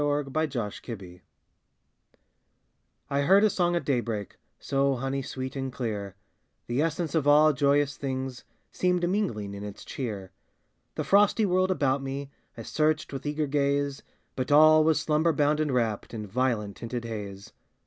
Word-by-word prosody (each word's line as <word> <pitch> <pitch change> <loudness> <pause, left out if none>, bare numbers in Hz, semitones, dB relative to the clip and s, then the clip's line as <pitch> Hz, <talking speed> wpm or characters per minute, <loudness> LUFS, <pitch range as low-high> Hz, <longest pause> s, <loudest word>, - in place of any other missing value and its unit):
THE 145 - +1 0.3
FIRST 155 -3 -1 0.3
RED 115 -3 -4
BIRD 90 -2 -13 1.9
I 140 0 +2
heard 195 +8 +5
a 215 - +4
song 175 -1 +1
at 170 - -1
daybreak, 115 -6 -2 0.2
So 135 0 +1
honey 135 +2 -2
sweet 130 0 -6
and 135 -1 -3
clear, 105 -6 -4 0.5
The 120 +4 0
essence 165 -1 -1
of 155 -4 +1
all 150 +1 +6
joyous 145 0 +2
things 130 -2 -4 0.3
Seemed 180 -1 +1
mingling 170 - -1
in 100 0 -7
its 105 -1 -8
cheer. 105 -8 -5 0.6
The - - -2
frosty 205 +2 +4
world 185 0 +2
about 140 -6 +1
me 135 +1 -5 0.3
I - - -6
searched 155 -1 0
with 135 +2 -5
eager 150 +1 -1
gaze, 140 -1 0 0.3
But 130 +2 -3
all 155 +1 +7
was 160 0 +3
slumber 160 +2 +2
bound 150 +1 +2
and 155 -2 0
wrapped 115 -3 -1
In 105 -1 -5
violet 110 -1 -1
tinted 120 0 -5
haze. 100 -3 -7
140 Hz, 160 wpm, -27 LUFS, 120-155 Hz, 1.9 s, all